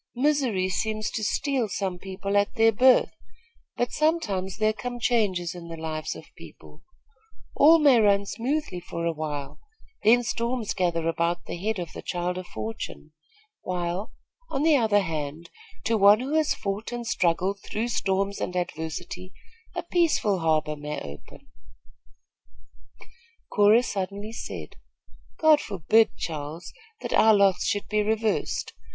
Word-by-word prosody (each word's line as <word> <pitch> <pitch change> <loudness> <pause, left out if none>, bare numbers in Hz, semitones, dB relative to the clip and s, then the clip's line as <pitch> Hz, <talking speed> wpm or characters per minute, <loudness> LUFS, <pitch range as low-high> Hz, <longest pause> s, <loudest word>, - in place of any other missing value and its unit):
Misery 255 -8 +1
seems 215 +3 -2
to 220 - -3
steal 265 0 0
some 190 -3 -3
people 195 +1 -4
at 205 +5 +2
their 225 -1 +5
birth; 255 +4 +5 0.7
but 245 0 0
sometimes 210 - 0
there 215 0 +2
come 245 +2 -5
changes 200 -8 +1
in 175 -1 -9
the 165 0 -7
lives 155 -1 -4
of - - -13
people. - - -14 0.7
All 320 +3 +7
may 285 -6 +5
run 200 -2 +3
smoothly 245 0 -2
for 170 -1 -5
a 170 - +1
while, 150 -3 -5 0.4
then 240 +3 +5
storms 235 -1 -2
gather 170 -3 0
about 170 +1 -1
the - - -5
head 210 +5 -2
of 175 -3 -6
the - - -7
child 180 0 -2
of 185 - -8
fortune, 220 -8 -6 0.5
while, 180 +2 -3 0.4
on 275 0 -1
the 320 -1 +5
other 220 -5 +3
hand, 160 -1 -5 0.3
to 225 -1 +1
one 200 +2 +7
who 265 +4 -3
has 310 -1 +2
fought 200 +3 -4
and 240 -1 -5
struggled 185 0 0
through 225 +3 -3
storms 200 -2 -1
and 180 - -3
adversity 180 +1 -4 0.4
a - - -2
peaceful 325 - +1
harbor 155 -2 +1
may 150 0 -5
open 75 - -11 1.4
" 470 0 -21
Cora 210 +3 +5
suddenly 200 0 -4
said: - - -7 0.6
"God 310 -2 +5
forbid, 210 +4 +2
Charles, 155 +1 -6 0.3
that - - -4
our 220 -1 +6
lots 195 -2 +3
should 205 - -1
be 210 0 +1
reversed. 220 +1 -1
200 Hz, 145 wpm, -26 LUFS, 175-235 Hz, 1.4 s, All